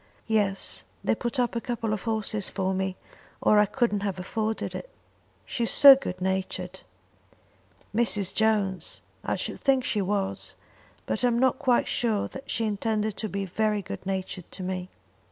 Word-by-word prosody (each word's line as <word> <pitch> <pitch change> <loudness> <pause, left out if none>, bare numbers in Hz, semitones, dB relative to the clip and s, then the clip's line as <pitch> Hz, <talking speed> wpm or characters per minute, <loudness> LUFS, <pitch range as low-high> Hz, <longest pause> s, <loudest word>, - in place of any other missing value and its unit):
"Yes; 205 -3 +1 0.2
they - - +2
put 240 +2 -3
up 245 -1 +1
a 235 - -1
couple 230 -3 -2
of 210 - -2
horses 215 -2 -1
for 190 -1 -1
me, 190 0 -2 0.4
or 210 - +5
I 210 - +5
couldn't 230 -2 +1
have 200 -2 -2
afforded 215 +4 -2
it." - - -6 0.6
"She - - -4
is - - 0
so 280 -1 +10
good 185 -9 -5
natured." 190 0 -2 1.2
"Mrs. 210 -5 +2
Jones! 210 -4 +1 0.2
I - - 0
should - - -4
think 265 -2 +3
she 210 -4 0
was; 195 0 -2 0.5
but - - -1
I'm 240 -1 +3
not 260 +1 +3
quite 255 -5 +3
sure 220 -4 +1
that 270 +1 -10
she 225 - 0
intended 215 0 -1
to 215 - -3
be 195 0 -2
very 210 +2 0
good - - -7
natured 190 -2 -4
to 190 - -6
me." 185 0 -3
210 Hz, 170 wpm, -27 LUFS, 190-230 Hz, 1.2 s, so